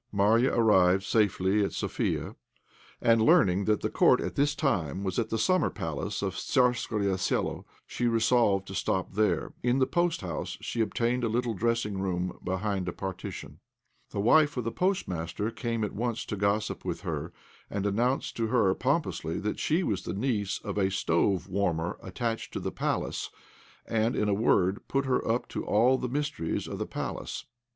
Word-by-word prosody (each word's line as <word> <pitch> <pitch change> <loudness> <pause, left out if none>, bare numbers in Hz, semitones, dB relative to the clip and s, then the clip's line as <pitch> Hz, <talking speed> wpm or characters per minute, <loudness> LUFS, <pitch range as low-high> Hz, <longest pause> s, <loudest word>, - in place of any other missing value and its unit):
Marya 110 +6 +3
arrived 95 -5 +4
safely 100 -1 +2
at 100 - -2
Sofia, - - -2 0.7
and, 115 -1 +5
learning 100 -3 +4
that 105 -1 +2
the - - -1
court - - +5
at - - -3
this 145 +1 +1
time 95 - -1
was 95 +2 -1
at 110 -2 -1
the 115 - -1
summer 185 +5 +2
palace 80 +7 -4
of 95 -2 -1
Tzarskoe 115 -6 +1
Selo, - - -1 0.2
she 120 - -1
resolved 115 -4 +3
to 95 - -8
stop 95 -1 -1
there. 100 -5 +1
In 125 +1 +2
the 130 - +4
post 175 +5 0
house 85 -5 -4
she 115 - -2
obtained 120 +3 0
a - - +2
little 120 +1 0
dressing 110 -1 -1
room 90 -1 -2
behind 95 0 -2
a - - -1
partition. 95 +1 -6 0.5
The - - -4
wife 145 +7 +4
of 125 - -1
the 115 - -2
postmaster 105 - -1
came 115 -2 -2
at 105 - -2
once 115 +1 -2
to - - -4
gossip 100 +2 0
with - - -3
her, - - -4 0.4
and 100 -1 -2
announced 120 +6 0
to 115 -1 0
her 110 -5 +3
pompously 130 - -1
that 105 - -2
she 165 +5 +1
was 100 - -1
the 85 - -5
niece 105 -3 -1
of 105 -1 -3
a 95 -1 +2
stove 95 0 +1
warmer 90 -4 -1
attached 115 +5 -4
to - - -2
the - - -3
Palace, - - -2 0.6
and, 115 +2 0
in 105 - +1
a 105 - +2
word, 100 -2 +2
put 135 0 0
her 130 -1 +1
up 115 +2 0
to - - -4
all 125 +5 +3
the 125 - -3
mysteries 145 - -2
of - - -5
the - - -2
Palace. - - -5
105 Hz, 180 wpm, -28 LUFS, 95-120 Hz, 0.7 s, and